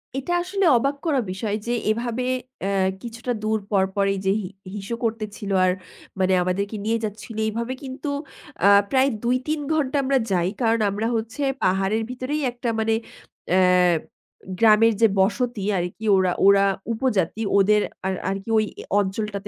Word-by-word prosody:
এটা 275 +6 -3
আসলে 390 +1 -1
অবাক 275 +4 0
করা 290 -5 +2
বিষয় 205 +2 -2
যে, 240 - 0 0.2
এভাবে 235 +2 -2 0.4
এ্যা 195 - 0 0.3
কিছুটা 235 +1 -5
দূর 220 0 +1
পরপরই 195 0 +1
যে 190 - +3
হি 185 - -5 0.3
হিসু 205 +3 -4
করতেছিল, 215 -3 -3
আর 185 - +3 0.5
মানে 185 0 +3
আমাদেরকে 200 +4 -2
নিয়ে 225 +1 +1
যাচ্ছিল, 215 +1 -6
এইভাবে 235 +4 -3
কিন্তু 265 +2 -5 0.6
আ 200 - +8 0.2
প্রায় 265 +1 +4
২, 250 +2 +2
৩ 310 0 0
ঘণ্টা 290 -2 0
আমরা 270 +1 +2
যাই। 175 -1 +2
কারণ 230 0 +2
আমরা 210 +3 -2
হচ্ছে 225 +5 -4 0.2
পাহাড়ের 195 +4 +1
ভিতরেই 255 +4 -3
একটা 240 0 -4
মানে 220 0 +1 0.6
এ্যা 185 +1 +4 1.0
গ্রামের 225 0 +6
যে 225 - +7
বসতি 230 +1 0
আর 175 - 0
কি 220 - -7
ওরা 185 -1 +2
ওরা 200 0 +6 0.3
উপজাতি 220 -5 0 0.2
ওদের 210 +2 +4 0.3
আর 190 - 0 0.2
আর 195 - -1
কি 225 - -10
ওই 215 - +3
অ - - -9 0.2
অঞ্চলটাতে 200 +1 -3
220 Hz, 160 wpm, -23 LUFS, 200-245 Hz, 1.0 s, আ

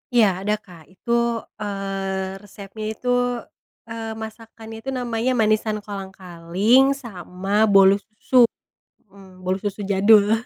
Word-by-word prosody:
Iya, 235 -3 +5 0.2
ada, 210 +1 +1
Kak. 180 -6 -15
Itu, 190 +5 -7 0.4
eee, 195 -2 -3
resepnya 205 +1 -9
itu, 220 +3 -9 0.8
eee, 225 -1 -5
masakannya 225 0 -9
itu 270 - -4
namanya 245 -1 -1
manisan 215 0 +1
kolang-kaling, 195 +4 +1
sama 200 -5 -2
bolu 195 0 +7
susu, 220 +4 +2 0.6
hmm, 190 -2 -17
bolu 185 0 -1
susu 205 0 -3
jadul. 205 +2 +5
205 Hz, 115 wpm, -22 LUFS, 195-225 Hz, 0.8 s, bolu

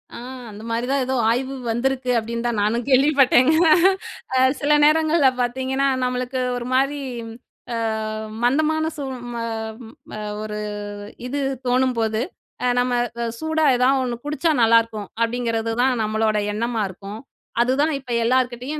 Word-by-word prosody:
அ - - -7 0.3
அந்த 210 +1 -10
மாதிரிதான் 250 +4 0
ஏதோ 260 +1 -1
ஆய்வு 260 +3 -1 0.2
வந்திருக்கு 255 +2 0
அப்டின்னுதான் 230 0 -2
நானும் 225 +3 0
கேள்விப்பட்டேங்க. 270 +1 +5 0.8
அ - - +3 0.2
சில 290 - 0
நேரங்கள்ல 310 -1 +4
பாத்தீங்கன்னா 260 +3 0 0.2
நம்மளுக்கு 250 +1 -2 0.2
ஒரு 240 - -5
மாரி, 275 +2 +2 0.7
ஆ - - -1 0.7
மந்தமான 315 +5 +2
சூ 285 - -4 0.3
ம - - -6 0.8
அ - - -5 0.2
ஒரு 210 0 -5 0.7
இது 280 +3 -2 0.3
தோணும்போது, 240 -3 +1 0.4
அ 250 - +2
நம்ம 250 0 +1 0.5
சூடா 315 0 0
ஏதாவது 260 +2 +3
ஒன்னு 240 0 -5
குடிச்சா 300 +2 +1
நல்லா 230 0 +6
இருக்கும் 215 -3 -8
அப்டிங்கறதுதான் 230 +1 0
நம்மளோட 215 0 +1 0.2
எண்ணமாருக்கும். 210 -2 -3 0.4
அதுதான் 275 +6 +2
இப்ப 255 -2 -10
எல்லார்கிட்டயும் 255 +4 0
250 Hz, 120 wpm, -22 LUFS, 230-275 Hz, 0.8 s, நல்லா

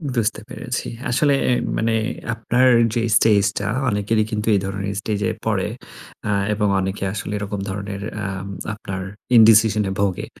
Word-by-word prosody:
বুঝতে 110 -1 0
পেরেছি। 125 0 -4 0.2
আসলে 140 +3 +3 0.2
এ - - +4 0.3
মানে 115 0 +1 0.4
আপনার 120 +3 +2 0.3
যে, 120 - +1 0.2
স্টেজটা 100 -2 +2 0.2
অনেকেরি 105 +1 +1
কিন্তু 105 0 -2
এই 100 - +3
ধরনের 95 +1 -3
স্টেজে 105 -1 -1
পড়ে - - 0 0.6
আ - - +2 0.2
এবং 105 0 +1
অনেকে 95 +1 -3
আসলে 105 0 -4
এরকম 105 0 -4
ধরনের 100 0 -5 0.2
আম 95 0 -4 0.3
আপনার 95 -3 -6 0.4
ইনডিসিশন 110 -1 +6
এ - - -3
ভোগে। 95 -3 0
105 Hz, 145 wpm, -21 LUFS, 100-115 Hz, 0.6 s, ইনডিসিশন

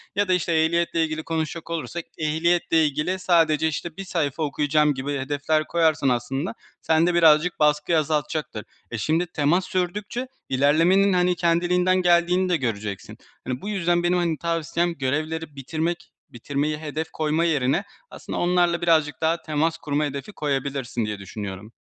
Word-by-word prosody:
ya 205 +1 +1
da, 185 - +2
işte, 180 -1 0
ehliyetle 165 +1 +2
ilgili 160 0 -3
konuşacak 160 0 -3
olursak, 170 +1 -4
ehliyetle 160 +1 +2
ilgili 150 +6 -1
sadece, 160 -4 +3
işte, 160 +2 -4
bir 195 - -5
sayfa 160 -4 -2
okuyacağım 150 +1 +2
gibi 140 +1 -3
hedefler 145 +3 0
koyarsan 160 -4 +2
aslında 135 - -2 0.3
sende 165 +2 +2
birazcık 165 0 +4
baskıyı 150 +2 +2
azaltacaktır. 150 -6 -2 0.3
Eee, 115 - -3
şimdi 160 +9 0
temas 165 +3 +1
sürdükçe 205 +7 -3 0.2
ilerlemenin, 165 +9 +3
hani, 180 0 +2
kendiliğinden 180 +2 +2
geldiğini 180 +1 +3
de 175 - +2
göreceksin. 105 -7 -4 0.3
Hani, 125 +1 -3
bu 205 - -5
yüzden 175 -4 +1
benim, 175 +1 +2
hani, 170 -3 0
tavsiyem 170 +1 -1
görevleri 155 +3 -2
bitirmek, 165 +6 -3 0.2
bitirmeyi 145 +5 -2
hedef 155 +1 -4
koyma 155 +2 0
yerine 145 +1 +1 0.3
aslında - - -6
onlarla 175 -1 +2
birazcık 155 -4 +2
daha 165 +1 +1
temas 155 +1 0
kurma 150 0 -1
hedefi 140 +8 -5
koyabilirsin 135 - -2
diye 105 -1 -4
düşünüyorum. 100 +1 -7
160 Hz, 150 wpm, -24 LUFS, 145-175 Hz, 0.3 s, birazcık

